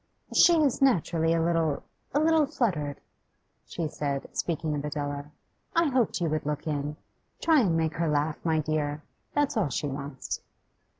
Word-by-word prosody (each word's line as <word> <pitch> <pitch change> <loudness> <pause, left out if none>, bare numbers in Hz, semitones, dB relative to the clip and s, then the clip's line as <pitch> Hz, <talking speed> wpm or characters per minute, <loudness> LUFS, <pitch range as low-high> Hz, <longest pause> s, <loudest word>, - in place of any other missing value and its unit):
'She 345 - +7
is 275 -3 +1
naturally 165 - +3
a 165 - +3
little 165 -3 +1 0.3
a 290 - +2
little 315 -1 +4
fluttered,' 170 - -1 0.7
she 165 -2 -3
said, 140 -2 -3
speaking 160 -2 -1
of 145 -1 -2
Adela. 145 -1 -3 0.5
'I 335 -2 +4
hoped 250 -7 +1
you 170 - +1
would 155 0 -1
look 150 0 -3
in. 150 -1 -2 0.4
Try 320 -2 +4
and 180 -9 +2
make 160 -1 0
her 165 0 +1
laugh, 150 +1 0
my 160 -2 +2
dear; 150 -1 -1 0.3
that's 290 -1 +2
all 205 -9 +1
she 135 - -2
wants. 140 -1 -4
160 Hz, 165 wpm, -28 LUFS, 145-215 Hz, 0.7 s, She